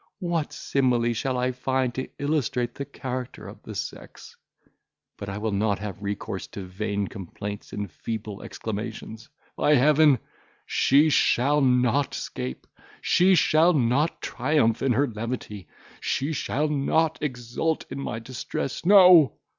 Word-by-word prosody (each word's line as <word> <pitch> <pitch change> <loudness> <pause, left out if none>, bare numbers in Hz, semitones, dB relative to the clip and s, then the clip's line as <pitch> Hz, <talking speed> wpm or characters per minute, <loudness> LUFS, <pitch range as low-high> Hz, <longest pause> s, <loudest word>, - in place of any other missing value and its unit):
what 170 -6 -2
simile 125 -5 +1
shall 130 +3 -2
I 125 +1 0
find 130 0 -1
to 130 +2 -4
illustrate 130 -5 -1
the 140 - -5
character 130 -2 -6
of - - -11
the - - -9
sex? - - -8 0.8
But 100 - -7
I 100 - -4
will 110 +1 -2
not 100 0 +1
have 105 -2 -7
recourse 100 0 -4
to 100 - -5
vain 100 +2 -3
complaints 100 +1 -7
and 105 -3 -5
feeble 110 +1 -6
exclamations. 110 +1 -6 0.3
By 150 - +3
Heaven! 150 +1 +5 0.5
she 150 +3 +3
shall 145 +2 +3
not 125 +1 +2
'scape, 65 +1 -5 0.3
she 185 +2 +4
shall 165 +2 +4
not 140 +3 +1
triumph 125 -4 +1
in 135 -2 +2
her 140 +4 +2
levity, 110 -3 -6 0.3
she 140 +4 -1
shall 150 +1 -1
not 155 +2 +1
exult 125 +3 -2
in - - -5
my 125 - -4
distress; 130 +2 -5
no! 180 -6 +7
125 Hz, 140 wpm, -25 LUFS, 110-145 Hz, 0.8 s, no